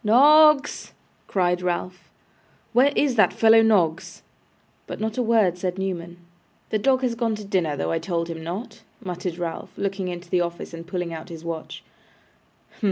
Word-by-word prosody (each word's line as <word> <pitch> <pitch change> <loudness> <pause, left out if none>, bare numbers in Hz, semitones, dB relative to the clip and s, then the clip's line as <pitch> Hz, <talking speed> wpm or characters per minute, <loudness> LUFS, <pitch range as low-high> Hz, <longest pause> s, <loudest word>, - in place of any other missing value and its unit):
'Noggs!' 295 +6 +5 0.3
cried 180 -2 0
Ralph, 180 0 -4 0.6
'where 260 +4 +5
is 270 -5 +1
that 215 -4 +5
fellow, 225 0 +5
Noggs?' 180 -8 +1 0.6
But - - -7
not 220 +2 -3
a - - +3
word 220 -7 +2
said 180 0 -3
Newman. 175 -3 -4 0.5
'The 215 - +1
dog 260 +3 +2
has 245 -2 +1
gone 230 -1 -1
to 210 - -8
his 200 - -13
dinner, 165 -6 0
though 80 0 -2
I - - 0
told 170 -3 -2
him 165 -1 -7
not,' 185 +9 -6 0.2
muttered 180 -2 -4
Ralph, 170 -2 -5
looking 195 -1 -2
into 175 0 -6
the 180 - +2
office, 170 0 -5
and 165 0 -9
pulling 175 -2 -4
out 160 +2 -8
his 165 -1 -9
watch. 165 -1 -6 0.9
'Humph! - - -24
185 Hz, 175 wpm, -23 LUFS, 170-225 Hz, 0.9 s, Noggs